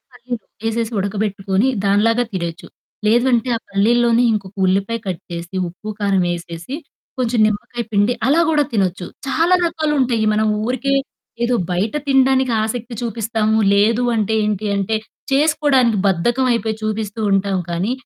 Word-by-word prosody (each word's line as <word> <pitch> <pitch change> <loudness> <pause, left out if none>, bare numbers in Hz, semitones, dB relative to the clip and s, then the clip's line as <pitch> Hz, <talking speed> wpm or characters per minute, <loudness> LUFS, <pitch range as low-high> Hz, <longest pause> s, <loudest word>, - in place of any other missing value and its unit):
పల్లీలు 245 -1 -6 0.3
ఏసేసి 230 +1 -2
ఉడకబెట్టుకొని, 200 +1 -1 0.2
దానిలాగా 225 +4 +3
తినొచ్చు. 170 -3 -4 0.4
లేదంటే 240 +2 +3
ఆ - - -3
పల్లిలోని 235 +4 +3
ఇంకొక 200 -2 -4
ఉల్లిపాయ 200 +5 0
కట్ 185 -1 -3
చేసి, 170 +2 -6
ఉప్పు, 180 +5 -10
కారం 195 -3 +2
ఏసేసి, 170 +7 -7 0.4
కొంచెం 245 -1 0
నిమ్మకాయ 215 +3 -3
పిండి. 205 +4 +3
అలా 305 +5 +4
కూడా 300 -2 +3
తినొచ్చు. 185 -4 0 0.2
చాలా 330 +6 +2
రకాలుంటాయి 275 -9 0
మనం 215 +1 +2 0.2
ఊరికే 260 +3 0 0.5
ఏదో 245 +1 +1 0.2
బయట 190 +7 -1
తినడానికి 265 -2 +3
ఆసక్తి 235 +2 -4
చూపిస్తాము 220 -1 0 0.2
లేదు 220 +4 +3
అంటే, 220 0 0
ఏంటి 210 0 -1
అంటే 200 +3 0 0.4
చేసుకోడానికి 275 -6 +3
బద్ధకమైయిపోయి 230 +4 +1
చూపిస్తూ 215 0 -3
ఉంటాం. 195 0 +1
కానీ, 180 +7 -1
220 Hz, 130 wpm, -19 LUFS, 200-245 Hz, 0.5 s, అలా